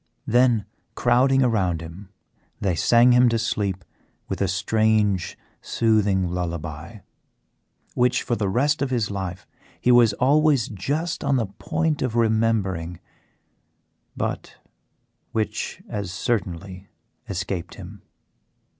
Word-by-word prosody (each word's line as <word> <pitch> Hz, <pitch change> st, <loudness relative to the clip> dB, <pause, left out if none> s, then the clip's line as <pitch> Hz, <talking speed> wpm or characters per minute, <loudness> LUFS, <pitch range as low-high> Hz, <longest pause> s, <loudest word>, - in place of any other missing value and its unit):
Then, 120 Hz, -4 st, +3 dB, 0.3 s
crowding 130 Hz, +2 st, +3 dB
around 95 Hz, -9 st, +1 dB
him, 85 Hz, +4 st, -10 dB, 0.5 s
they 95 Hz, -3 st, 0 dB
sang 120 Hz, +8 st, +4 dB
him 125 Hz, 0 st, +5 dB
to 115 Hz, -, +1 dB
sleep 100 Hz, -5 st, -2 dB, 0.4 s
with -, -, -4 dB
a 100 Hz, -, +2 dB
strange 105 Hz, 0 st, +1 dB, 0.2 s
soothing 100 Hz, -5 st, +1 dB
lullaby, 85 Hz, +2 st, -5 dB, 0.9 s
which 125 Hz, 0 st, +2 dB
for 120 Hz, -, -1 dB
the 100 Hz, -4 st, -1 dB
rest 140 Hz, +8 st, +1 dB
of 140 Hz, -, 0 dB
his 115 Hz, -5 st, -1 dB
life 95 Hz, -3 st, -5 dB, 0.3 s
he 125 Hz, -, +3 dB
was 120 Hz, -3 st, +6 dB
always 140 Hz, +1 st, +3 dB
just 145 Hz, -, -3 dB
on 140 Hz, -1 st, +2 dB
the 120 Hz, -4 st, +1 dB
point 155 Hz, -, -2 dB
of 130 Hz, -3 st, -1 dB
remembering, 110 Hz, -7 st, 0 dB, 1.2 s
but -, -, -4 dB, 0.8 s
which 110 Hz, -2 st, -3 dB
as 100 Hz, -4 st, -4 dB
certainly 95 Hz, -3 st, -3 dB, 0.4 s
escaped 90 Hz, -2 st, -4 dB
him. -, -, -11 dB
110 Hz, 115 wpm, -23 LUFS, 95-125 Hz, 1.2 s, was